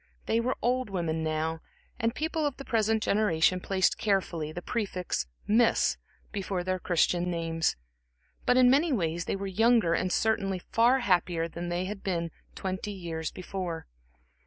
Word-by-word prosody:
They 225 - +2
were 250 +3 -1
old 250 -1 +1
women 165 -4 -1
now, 160 +1 -1 0.4
and 230 +1 0
people 315 0 -1
of 290 -3 -1
the 275 - -8
present 220 -1 +1
generation 185 -4 +3
placed 190 0 +1
carefully 180 -7 0
the 175 +2 -7
prefix 185 - -2 0.2
"Miss" 225 +2 +3 0.3
before 195 -3 -2
their 185 0 -1
Christian 175 0 +1
names; 165 -1 0 0.7
but 250 - +5
in 255 -1 +7
many 290 +6 +4
ways, 170 - 0
they - - -1
were 195 0 -4
younger 215 -1 +3
and 185 +2 0
certainly 195 -3 +1
far 235 +8 +3
happier 175 -5 +1
than 170 +1 -5
they 175 +1 -1 0.2
were 170 -3 -1 0.3
twenty 190 +2 -3
years 165 -4 -4
before. 180 -3 -5
185 Hz, 155 wpm, -29 LUFS, 170-225 Hz, 0.7 s, in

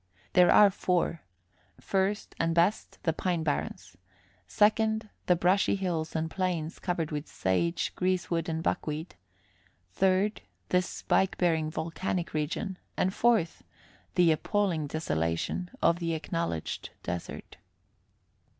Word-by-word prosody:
There 180 -1 +6
are 205 -1 +7
four: 175 -3 0 0.6
first, 195 +2 -1
and 165 0 +1
best, 175 +5 +1
the 165 - +1
pine 175 0 -1
barrens; 95 - -3 0.5
second, 220 - +2 0.2
the 180 - +5
brushy 185 +4 +3
hills 170 -5 -2
and 160 0 0
plains, 170 -2 -2
covered 170 -4 -2
with 150 0 -3
sage, 165 - 0
greasewood 175 -2 0
and 160 0 -2
buckweed; 155 +2 -2 0.8
third, 190 - +2 0.3
this 180 -1 +2
spike 190 - +1
bearing 160 -3 +2
volcanic 170 +3 -3
region; 165 +5 -2 0.2
and 185 - +1
fourth, 225 -9 +2 0.5
the 175 -2 +5
appalling 170 -1 0
desolation 85 - -2
of 170 +1 +4
the 165 -1 -1
acknowledged 165 - -3
desert. 85 0 -6
170 Hz, 115 wpm, -29 LUFS, 160-185 Hz, 0.8 s, are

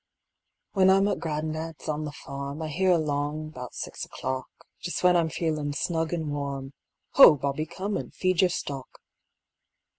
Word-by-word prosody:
When 190 -2 +4
I'm 195 +1 +5
at - - -1
gran'dad's 155 0 -4
on 155 0 -1
the 150 - -4
farm, 140 +1 -6
I 155 - -3
hear 185 +5 +1
along 155 -2 0
'bout 125 -4 -8
six - - -5
o'clock, 130 0 -4 0.3
Just 175 - -3
when 180 0 +6
I'm 165 -2 +3
feelin' 150 -1 -1
snug 160 +2 -1
an' 160 -3 -2
warm, 140 -1 -4 0.4
"Ho, 270 - +9
Bobby, 140 +3 -2
come 195 +4 -3
and - - -6
feed 185 -2 +1
your 185 - +5
stock." 135 -6 -5
155 Hz, 160 wpm, -27 LUFS, 145-175 Hz, 0.4 s, Ho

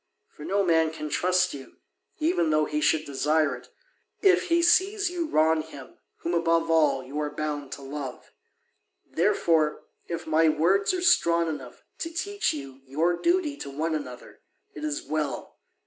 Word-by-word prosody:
For 150 - -13
no 200 +5 +1
man 160 -3 +3
can 155 -1 -6
trust 185 +3 +2
you, 135 -2 -11 0.4
even 305 - +1
though 155 0 +3
he 150 0 -2
should 155 0 +2
desire 150 +3 +1
it, - - -14 0.5
if 375 -2 +5
he 340 0 +3
sees 380 +2 +3
you 345 -2 -2
wrong 160 - +3
him 145 -4 -12 0.2
whom 170 - -2
above 165 -1 +2
all 145 -5 +3
you 140 +4 -6
are 150 -1 -1
bound 150 -2 -4
to 140 - -9
love. 135 -2 -7 0.7
Therefore, 155 -3 +1 0.2
if 170 0 -5
my 160 0 +3
words 170 +6 +2
are 365 -1 -2
strong 170 - +4
enough 140 -6 -7 0.2
to 330 - -3
teach 405 +5 -1
you 135 -2 -8
your 160 +6 +1
duty 340 - +1
to 140 - -7
one 155 +4 -2
another, 130 -5 -7 0.3
it 150 - -9
is 150 -1 -2
well. 150 -2 -4
160 Hz, 165 wpm, -26 LUFS, 150-190 Hz, 0.7 s, if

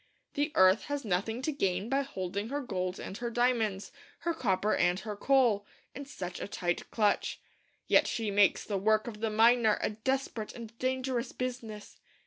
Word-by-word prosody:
The 290 +2 0
earth 185 +3 +5
has 285 -3 -3
nothing 220 +6 -1
to 310 - 0
gain 195 -7 -1
by 270 +3 +1
holding 200 -5 -4
her 285 +2 -2
gold 185 -7 -3
and 190 - -6
her 240 -1 -3
diamonds, 230 -5 0 0.3
her 340 - 0
copper 210 - +1
and 180 +1 +2
her 215 -3 -5
coal, 240 -3 +3 0.3
in 280 +2 -7
such 180 -9 -6
a - - -4
tight 175 -3 -2
clutch. 210 -2 +1 0.5
Yet - - +4
she 220 -3 -2
makes 200 -1 +4
the 200 -2 -2
work 215 +2 +2
of 220 -3 -7
the 225 0 0
miner 225 0 +4
a - - -1
desperate 225 0 -3
and 230 -1 -9
dangerous 255 -1 -1
business. 240 -4 -6
220 Hz, 175 wpm, -30 LUFS, 200-255 Hz, 0.5 s, earth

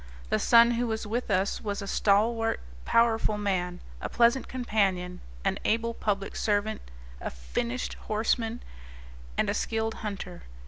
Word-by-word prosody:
The - - +3
son 235 0 +7
who 240 +1 0
was 220 -1 -2
with 235 +4 -2
us 190 +2 +1
was 205 -2 -3
a 200 - -4
stalwart, 225 +3 +2 0.3
powerful 225 -2 +3
man, 185 -3 -1 0.2
a - - -3
pleasant 235 +3 +3
companion, 195 -7 0 0.2
an - - +1
able 230 +1 +1
public 200 -3 -2
servant, 210 0 0 0.4
a - - -2
finished 235 - -3 0.2
horseman, 225 +2 0 0.7
and - - +2
a - - +1
skilled 225 0 -1
hunter. 195 -4 -5
220 Hz, 140 wpm, -28 LUFS, 200-230 Hz, 0.7 s, son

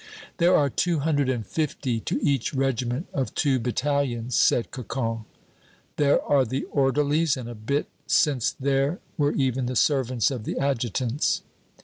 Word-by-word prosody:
"There 175 +1 +4
are 145 - +4
two 170 0 0
hundred 145 -3 +1
and 120 -4 -1
fifty 140 -4 -2
to - - -2
each 140 -1 0
regiment 130 - -1
of 135 -2 -2
two 135 -3 +2
battalions," 125 -1 -1
said 120 - +3
Cocon. 115 -3 -3 0.7
"There 145 -1 +4
are 140 -2 +3
the 130 +3 -3
orderlies, 145 +3 +2
and 125 -2 -6
a 120 - -6
bit 120 +7 -1 0.2
since 135 -6 +2
there 140 +5 0 0.2
were 145 -3 +1
even 130 -2 0
the 125 - -3
servants 130 -1 +2
of 125 -5 -4
the - - -4
adjutants." 125 -1 0
135 Hz, 150 wpm, -25 LUFS, 120-145 Hz, 0.7 s, There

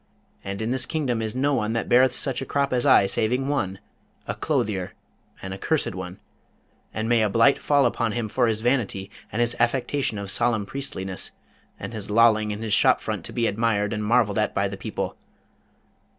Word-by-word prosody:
And 100 +2 -4
in 115 - -1
this 130 0 0
kingdom 130 -8 -1
is 110 +1 -3
no 140 +3 +1
one 110 -4 0
that 115 - -2
beareth 125 +2 +4
such 130 -2 0
a - - -3
crop 140 -1 0
as 125 -1 +1
I, - - +6
saving 125 +7 0
one, 100 -10 -1 0.5
a - - -3
clothier, 95 -4 -2 0.5
an 95 0 -5
accursed 150 +9 -1
one! 90 0 -7 0.7
and 110 +1 -3
may 115 -1 +3
a 105 - +2
blight 115 +7 +4
fall 145 -2 +3
upon 115 -2 0
him 120 -2 -2
for 120 +3 +1
his 110 -1 -1
vanity 110 -6 -1 0.2
and 115 - -1
his 120 0 +1
affectation 120 0 0
of 100 -1 -5
solemn 120 -3 +1
priestliness, 95 -8 -4 0.5
and - - -6
his 105 -2 -5
lolling 110 -1 +4
in 105 +1 -4
his 110 -2 -1
shop - - +5
front - - -4
to - - -4
be 120 - 0
admired 105 -1 0
and 105 -1 -3
marvelled 110 -1 +2
at 105 - 0
by 100 0 +1
the 100 - -6
people. 100 - -4
115 Hz, 195 wpm, -24 LUFS, 105-125 Hz, 0.7 s, I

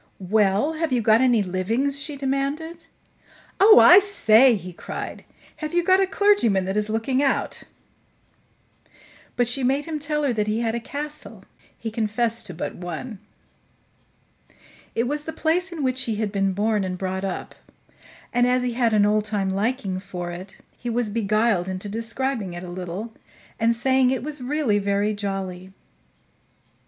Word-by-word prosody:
"Well, 210 +8 +3
have 320 -2 -2
you 250 - +2
got 220 +1 +4
any 245 -5 +3
livings?" 225 +10 -1
she 290 0 -4
demanded. 285 +5 -3 0.7
"Oh, 430 +3 +8
I 365 - +9
say!" 260 - +4
he 180 -3 -7
cried. - - -7 0.3
"Have 310 +2 -5
you 350 - +3
got 375 +2 +4
a 385 - +2
clergyman 375 - +2
that 190 +1 -3
is 210 0 0
looking 225 +5 0
out?" 275 -2 0 1.7
But 245 -1 +1
she 255 +2 -1
made 270 +3 +1
him 320 -2 -4
tell 300 0 -1
her 270 -4 +1
that 210 -2 -1
he 215 +2 0
had 225 -1 -1
a 235 - -2
castle; 295 +5 -8 0.3
he 225 - -5
confessed 225 +1 -1
to 180 - -7
but 170 - -4
one. 180 +5 -7 1.8
It 230 +1 0
was 295 +2 -3
the 320 - -4
place 355 +4 0
in 325 -4 -4
which 255 0 0
he 225 - -2
had 210 -1 -2
been 195 -1 0
born 210 +1 0
and 185 -1 -3
brought 190 0 -3
up, 190 -2 -4 0.8
and, 245 0 +3
as 250 0 +2
he 245 -1 -1
had 230 -2 +1
an 205 -1 +4
old 210 0 +2
time 205 -3 -1
liking 200 -1 -1
for 180 -3 -6
it, 185 +3 -9 0.2
he 240 - -6
was 235 -2 -1
beguiled 215 -3 +1
into 185 +2 -5
describing 230 -1 -3
it 175 +1 -7
a 180 - -8
little 185 +5 -6 0.5
and 230 +1 +2
saying 260 +1 +2
it 255 -2 -1
was 295 -1 -3
really 255 -5 0
very 200 +1 0
jolly. 190 -2 -5
230 Hz, 170 wpm, -23 LUFS, 200-275 Hz, 1.8 s, I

